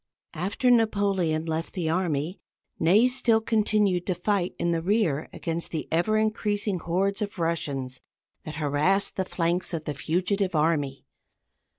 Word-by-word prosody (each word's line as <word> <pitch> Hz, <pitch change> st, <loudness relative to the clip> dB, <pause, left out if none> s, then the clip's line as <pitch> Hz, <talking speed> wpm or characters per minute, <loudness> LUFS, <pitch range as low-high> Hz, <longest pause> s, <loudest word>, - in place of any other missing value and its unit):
After 200 Hz, +9 st, +1 dB
Napoleon 200 Hz, -8 st, +2 dB
left 160 Hz, 0 st, -3 dB
the 175 Hz, -4 st, -2 dB
army, 165 Hz, 0 st, -1 dB, 0.4 s
Ney 195 Hz, +9 st, +5 dB
still 245 Hz, -3 st, +2 dB
continued 210 Hz, -4 st, +1 dB
to 185 Hz, -, 0 dB
fight 185 Hz, 0 st, -1 dB
in 170 Hz, -, 0 dB
the 165 Hz, -1 st, 0 dB
rear 175 Hz, -6 st, +1 dB
against 165 Hz, 0 st, -3 dB
the 160 Hz, -, -4 dB
ever 175 Hz, +7 st, +2 dB
increasing 210 Hz, -3 st, 0 dB
hordes 195 Hz, +5 st, -1 dB
of 205 Hz, -1 st, -3 dB
Russians 140 Hz, -6 st, -2 dB, 0.4 s
that 155 Hz, -, -7 dB
harassed 155 Hz, +7 st, +1 dB
the 190 Hz, -, -1 dB
flanks 175 Hz, 0 st, -1 dB
of 160 Hz, -, -4 dB
the 150 Hz, -, -2 dB
fugitive 185 Hz, +5 st, -1 dB
army. 150 Hz, -3 st, 0 dB
180 Hz, 145 wpm, -26 LUFS, 160-205 Hz, 0.4 s, Ney